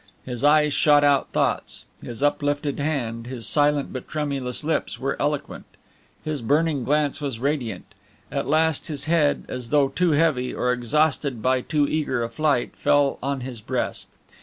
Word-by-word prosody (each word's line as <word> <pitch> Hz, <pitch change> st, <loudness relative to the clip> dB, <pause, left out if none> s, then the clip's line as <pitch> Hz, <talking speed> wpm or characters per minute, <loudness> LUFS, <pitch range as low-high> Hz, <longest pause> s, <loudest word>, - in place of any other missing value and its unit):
His 125 Hz, -1 st, -5 dB
eyes 150 Hz, 0 st, +4 dB
shot 145 Hz, -1 st, +4 dB
out 140 Hz, -2 st, +3 dB
thoughts; -, -, -1 dB, 0.2 s
his 120 Hz, +3 st, -6 dB
uplifted 145 Hz, 0 st, 0 dB
hand, 120 Hz, -6 st, -2 dB
his 125 Hz, -3 st, -5 dB
silent 145 Hz, -1 st, +1 dB
but 130 Hz, -, -6 dB
tremulous 140 Hz, -4 st, -3 dB
lips 160 Hz, +2 st, -1 dB
were 135 Hz, +1 st, -2 dB
eloquent; 145 Hz, 0 st, -2 dB, 0.6 s
his 155 Hz, -3 st, -2 dB
burning 145 Hz, +3 st, +1 dB
glance 150 Hz, +2 st, 0 dB
was 135 Hz, -6 st, -3 dB
radiant; 125 Hz, -8 st, -2 dB, 0.5 s
at -, -, -2 dB
last 160 Hz, +1 st, +1 dB
his 145 Hz, -4 st, -3 dB
head, 160 Hz, -3 st, +2 dB
as 125 Hz, -2 st, -6 dB
though 140 Hz, -1 st, +3 dB
too 165 Hz, +4 st, +1 dB
heavy, 145 Hz, -5 st, +1 dB
or 125 Hz, 0 st, +1 dB
exhausted 135 Hz, +1 st, 0 dB
by 130 Hz, 0 st, +2 dB
too 150 Hz, +1 st, +1 dB
eager 140 Hz, -6 st, -1 dB
a 115 Hz, -, -3 dB
flight, 140 Hz, 0 st, 0 dB
fell 145 Hz, -1 st, +2 dB
on 140 Hz, 0 st, -2 dB
his 125 Hz, -3 st, -7 dB
breast. -, -, -3 dB
145 Hz, 160 wpm, -24 LUFS, 125-150 Hz, 0.6 s, eyes